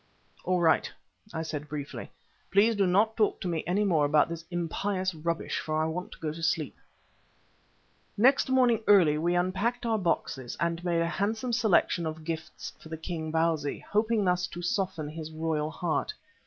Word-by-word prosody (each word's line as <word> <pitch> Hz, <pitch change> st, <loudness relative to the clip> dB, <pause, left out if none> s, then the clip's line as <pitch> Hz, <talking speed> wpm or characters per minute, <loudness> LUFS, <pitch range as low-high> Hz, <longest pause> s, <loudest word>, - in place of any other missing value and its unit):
"All 180 Hz, 0 st, +1 dB
right," 165 Hz, -2 st, +3 dB, 0.4 s
I 160 Hz, -, -3 dB
said 150 Hz, -2 st, -5 dB
briefly. 145 Hz, -1 st, -6 dB, 0.4 s
"Please 215 Hz, +4 st, +4 dB
do 200 Hz, -2 st, +2 dB
not 210 Hz, +5 st, +3 dB
talk 215 Hz, -2 st, +1 dB
to -, -, -3 dB
me 165 Hz, -3 st, -1 dB
any 190 Hz, +4 st, +2 dB
more 170 Hz, -7 st, +3 dB
about 150 Hz, +2 st, +3 dB
this 165 Hz, -1 st, -5 dB
impious 185 Hz, +2 st, -1 dB
rubbish, 165 Hz, +1 st, -2 dB
for 155 Hz, 0 st, -2 dB
I 155 Hz, -, +2 dB
want 170 Hz, +3 st, -4 dB
to -, -, -15 dB
go 155 Hz, -2 st, -3 dB
to 165 Hz, -, -9 dB
sleep." 165 Hz, -2 st, 0 dB, 1.4 s
Next 260 Hz, +5 st, +4 dB
morning 250 Hz, -4 st, +3 dB
early 170 Hz, -7 st, +6 dB
we 175 Hz, +2 st, +1 dB
unpacked 190 Hz, +8 st, 0 dB
our 225 Hz, -2 st, +1 dB
boxes 135 Hz, -8 st, -2 dB
and 170 Hz, +1 st, -1 dB
made 170 Hz, -2 st, +1 dB
a 165 Hz, -, +1 dB
handsome 215 Hz, +7 st, -1 dB
selection 205 Hz, -7 st, +2 dB
of 160 Hz, 0 st, -6 dB
gifts 160 Hz, 0 st, -5 dB
for 160 Hz, -, -12 dB
the 160 Hz, -, -5 dB
king, 160 Hz, -1 st, -4 dB
Bausi, 160 Hz, -3 st, 0 dB
hoping 215 Hz, 0 st, +2 dB
thus 180 Hz, 0 st, +1 dB
to 175 Hz, +1 st, -8 dB
soften 175 Hz, -4 st, -1 dB
his 155 Hz, +1 st, -7 dB
royal 155 Hz, -1 st, -1 dB
heart. 160 Hz, 0 st, -2 dB
170 Hz, 180 wpm, -28 LUFS, 160-200 Hz, 1.4 s, early